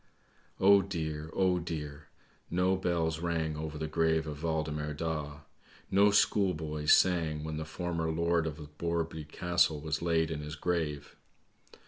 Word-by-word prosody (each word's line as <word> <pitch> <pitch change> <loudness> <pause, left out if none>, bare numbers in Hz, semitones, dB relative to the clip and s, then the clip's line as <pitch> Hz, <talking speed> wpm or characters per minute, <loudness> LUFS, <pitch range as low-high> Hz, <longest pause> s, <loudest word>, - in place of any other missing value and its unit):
"'Oh 100 +1 +7
dear! 80 -5 -4
Oh 95 -2 +2
dear! 75 -3 -6 0.4
No 90 +2 +2
bells 85 -3 0
rang 80 -2 -1
over 75 0 -5
the 80 - -3
grave 80 0 +1
of 75 -1 -6
Waldemar 75 -2 -2
Daa. 75 -2 -4 0.5
No 100 +2 +5
schoolboys 80 -7 +2
sang 80 -5 +3
when 80 0 -4
the 80 - -4
former 85 0 -3
lord 85 0 +1
of 75 -1 -5 0.2
Borreby 85 -2 -2
Castle 80 0 +1
was 80 +1 -3
laid 80 -2 +1
in 75 - -3
his 75 +1 -6
grave. 75 -3 -2
80 Hz, 140 wpm, -31 LUFS, 75-85 Hz, 0.5 s, Oh